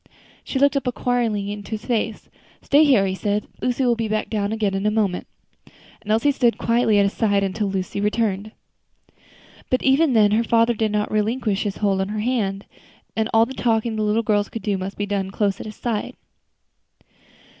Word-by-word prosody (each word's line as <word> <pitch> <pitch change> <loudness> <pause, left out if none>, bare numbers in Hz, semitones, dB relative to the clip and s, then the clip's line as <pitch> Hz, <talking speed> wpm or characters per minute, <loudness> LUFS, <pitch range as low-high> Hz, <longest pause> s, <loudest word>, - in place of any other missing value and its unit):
She - - -4
looked 280 +1 +3
up 270 -2 -1
inquiringly 235 -5 -1
into 205 +1 -8
his 215 0 -5
face. 225 -3 -2 0.4
"Stay 290 +2 +5
here," 250 -9 +4
he 190 - -1
said. 205 +2 -1 0.2
"Lucy 250 +1 0
will 240 -1 +3
be 225 -1 -2
down 215 -1 -1
again 215 -3 0
in 195 +2 -1
a - - +4
moment." 210 -4 -1 0.7
And 210 - -12
Elsie 225 +7 +3
stood 245 -4 +1
quietly 230 -2 +2
at 200 - +5
his 200 - -1
side 200 -3 +1
until 200 +2 -1
Lucy 190 +1 -3
returned. 210 -1 -1 1.2
But 255 - +1
even 270 +2 +3
then 210 -3 +4
her 220 +2 +2
father 230 +1 +3
did 220 -1 -1
not 210 0 -1
relinquish 215 -1 0
his 205 -2 -3
hold 195 -2 +1
of 190 - -2
her 215 0 -3
hand, 210 -5 -1 0.5
and 220 +1 0
all 225 0 +5
the 260 - -8
talking 225 -2 0
the 215 - -2
little 215 +2 +1
girls 205 -1 +1
could 225 - -7
do 205 -2 0
must 190 +1 -5
be 205 - -1
done 200 -2 -2
close 200 0 -1
at - - -7
his 215 - -8
side. 230 -4 -3
215 Hz, 200 wpm, -22 LUFS, 205-235 Hz, 1.2 s, Stay